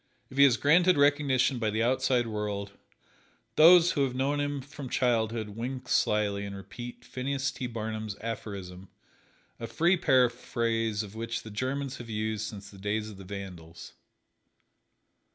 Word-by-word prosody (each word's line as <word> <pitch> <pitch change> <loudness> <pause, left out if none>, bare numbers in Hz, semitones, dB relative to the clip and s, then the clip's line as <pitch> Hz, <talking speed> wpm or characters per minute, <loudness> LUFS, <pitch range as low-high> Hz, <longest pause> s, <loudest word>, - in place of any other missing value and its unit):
If 130 - -10
he 140 - +9
is 125 -5 +4
granted 175 +6 +4
recognition 140 -3 +3
by 110 -2 0
the 110 +2 0
outside 130 0 +2
world, 105 -2 -3 0.8
those 170 +2 +8
who 140 - +1
have 130 -2 -1
known 140 +3 0
him 145 0 -1
from 140 0 -9
childhood 115 -3 0
wink 125 +4 -5
slyly 105 -4 +1
and 100 -1 -6
repeat 105 +5 -9
Phineas 135 +2 -2
T. 130 - -5
Barnum's 110 -2 -4
aphorism, 95 -5 -6 0.7
a 115 - -5
free 175 +9 +2
paraphrase 115 - +1
of 100 -1 -10
which 115 +1 -4
the 110 - -9
Germans 130 +4 -3
have 120 -1 -9
used 110 0 -2
since 100 -2 -9
the 100 - -14
days 105 +2 -2
of 100 - -12
the 95 - -10
Vandals. 90 -4 -9
115 Hz, 155 wpm, -29 LUFS, 105-135 Hz, 0.8 s, he